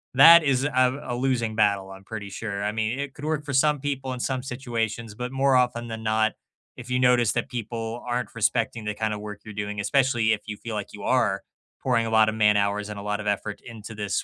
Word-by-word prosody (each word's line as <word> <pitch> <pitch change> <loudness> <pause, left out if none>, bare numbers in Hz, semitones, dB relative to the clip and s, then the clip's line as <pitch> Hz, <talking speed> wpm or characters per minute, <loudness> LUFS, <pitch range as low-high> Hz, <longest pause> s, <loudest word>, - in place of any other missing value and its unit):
That 165 +5 +9
is 135 -2 +2
a 130 -1 +2
a 120 - -2
losing 120 -3 0
battle, 100 -3 +2
I'm 95 0 -11
pretty 105 0 -7
sure. 100 -1 -4
I 105 - 0
mean, 110 +4 -1
it 140 -1 -4
could 145 - -8
work 155 -1 -1
for 140 - -4
some 150 +2 +3
people 135 -1 -3
in 125 - -6
some 130 +1 -1
situations, 115 -4 -3
but 125 +2 -4
more 135 0 +3
often 125 -2 +1
than 110 -1 -6
not, 110 0 +2 0.4
if 125 0 -9
you 125 0 +1
notice 125 -3 +4
that 120 - -1
people 115 0 -5
aren't 120 +1 -2
respecting 115 0 0
the 105 0 -2
kind 110 0 -1
of 105 - -5
work 105 -1 -7
you're 110 - -8
doing, 105 0 -4
especially 120 0 +2
if 105 - -3
you 105 -1 -5
feel 115 +1 -7
like 105 -2 -4
you - - -9
are - - +1 0.4
pouring 115 - +1
a - - -2
lot 110 -1 +5
of 110 - -3
man-hours 105 -1 +2
and 105 -1 -6
a - - -6
lot 105 +1 -2
of 105 - -6
effort 105 0 -2
into 110 -1 -9
this 105 -1 -2
115 Hz, 240 wpm, -25 LUFS, 105-125 Hz, 0.4 s, That